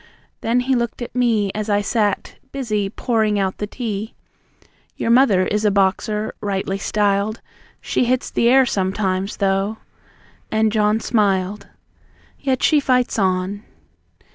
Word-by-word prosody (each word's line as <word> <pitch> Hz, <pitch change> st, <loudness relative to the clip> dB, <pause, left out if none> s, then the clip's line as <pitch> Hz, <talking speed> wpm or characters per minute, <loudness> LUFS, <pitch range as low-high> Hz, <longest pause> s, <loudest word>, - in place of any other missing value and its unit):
Then, 240 Hz, +2 st, +1 dB
he 265 Hz, +2 st, 0 dB
looked 235 Hz, -1 st, -1 dB
at 240 Hz, -, -8 dB
me 225 Hz, -5 st, +1 dB
As 215 Hz, 0 st, -4 dB
I 205 Hz, 0 st, +2 dB
sat, 205 Hz, -1 st, -1 dB
busy, 215 Hz, -7 st, -2 dB
pouring 220 Hz, -1 st, 0 dB
out 190 Hz, -1 st, -1 dB
the 210 Hz, -, -2 dB
tea: 215 Hz, -2 st, -5 dB, 0.8 s
"Your 230 Hz, -, 0 dB
mother 235 Hz, -7 st, +4 dB
is 210 Hz, +2 st, -1 dB
a 210 Hz, -, +4 dB
boxer, 205 Hz, +2 st, 0 dB
rightly 195 Hz, -1 st, -2 dB
styled. 205 Hz, +1 st, 0 dB, 0.4 s
She -, -, 0 dB
hits 255 Hz, +1 st, 0 dB
the 235 Hz, -, +2 dB
air 265 Hz, +1 st, +6 dB
sometimes, 190 Hz, -2 st, -1 dB
though," 195 Hz, +2 st, 0 dB, 0.7 s
and 220 Hz, 0 st, +2 dB
John 215 Hz, 0 st, +2 dB
smiled. 200 Hz, -3 st, 0 dB, 0.7 s
"Yet 265 Hz, -3 st, -1 dB
she 305 Hz, -, +5 dB
fights 250 Hz, -4 st, +1 dB
on." 190 Hz, +1 st, 0 dB
210 Hz, 140 wpm, -20 LUFS, 195-235 Hz, 0.8 s, air